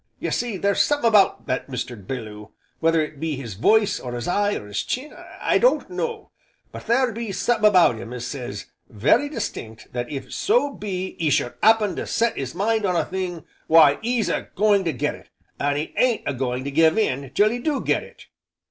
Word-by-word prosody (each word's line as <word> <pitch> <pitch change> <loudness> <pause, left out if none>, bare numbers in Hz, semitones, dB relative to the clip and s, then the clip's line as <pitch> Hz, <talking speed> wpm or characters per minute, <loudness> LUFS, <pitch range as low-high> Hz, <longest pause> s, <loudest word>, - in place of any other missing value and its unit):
Ye - - -3
see, 235 -5 -2
there's 200 +1 +2
summat 290 -4 +1
about 210 -4 +4
Mr. 125 -1 -3
Belloo, 105 -1 -7 0.3
whether 165 0 +3
it 150 -2 -8
be 160 -1 -2
his 125 -6 -7
voice, 210 - +3
or 125 -1 -6
his 120 -1 -4
eye, 205 +3 +1
or - - -6
his 105 0 -3
chin, 275 +4 -4 0.3
I - - +2
don't - - +2
know, 465 -3 -4 0.4
but - - -10
there 245 +2 +2
be 230 -1 -5
summat 215 +3 +1
about 180 - +4
him 115 - -8
as 125 -1 -5
says, 120 -7 -6 0.2
very 130 - +2
distinct 110 - -6
that 120 +1 -4
if 140 -2 -6
so 405 -10 +1
be 190 -4 -4
'e 160 -3 +1
should 125 -3 +1
'appen 220 -2 +4
to - - -4
set 230 +1 +1
'is 130 -2 -5
mind 220 +2 +1
on 185 -3 +1
a - - +1
thing, 180 -3 -4 0.2
why 155 -3 +6
'e's 235 -1 0
a - - -2
going 205 -1 +3
to 165 - +1
get 125 - -2
it, - - -15 0.3
an' 145 0 0
'e 150 - -4
ain't 250 -3 +2
a 140 - -1
going 125 0 -2
to 140 - -4
give 160 +4 +4
in 140 -11 0
till 210 +1 +4
'e 245 - -3
do 290 +2 -1
get - - 0
it. - - -15
175 Hz, 210 wpm, -23 LUFS, -, 0.4 s, why